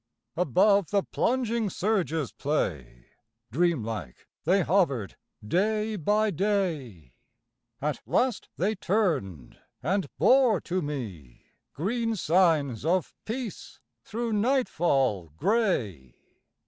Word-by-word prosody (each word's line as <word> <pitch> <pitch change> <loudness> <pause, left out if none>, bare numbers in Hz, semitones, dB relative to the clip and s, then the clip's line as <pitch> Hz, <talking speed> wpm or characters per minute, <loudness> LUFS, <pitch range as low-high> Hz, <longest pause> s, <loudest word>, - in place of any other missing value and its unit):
Above 185 - +3
the 200 -2 +2
plunging 235 -3 0
surge's 170 - -1
play 70 - -3 0.5
Dream 165 -1 +1
like 105 - -6 0.2
they 185 +3 +3
hovered, 145 - +1 0.3
day 215 - +1
by 210 +4 +1
day. 155 - -2 0.7
At 145 -2 -2
last 250 -5 0
they 200 +5 +1
turned, 155 - -1 0.2
and 185 +3 0
bore 230 - +5
to 185 +1 -2
me 110 - -6 0.3
Green 225 - -1
signs 160 - +2
of 175 +1 0
peace 230 -2 -6 0.2
thro' 230 +1 -3
nightfall 170 - +1
gray. 115 - 0
175 Hz, 95 wpm, -27 LUFS, 130-210 Hz, 0.7 s, bore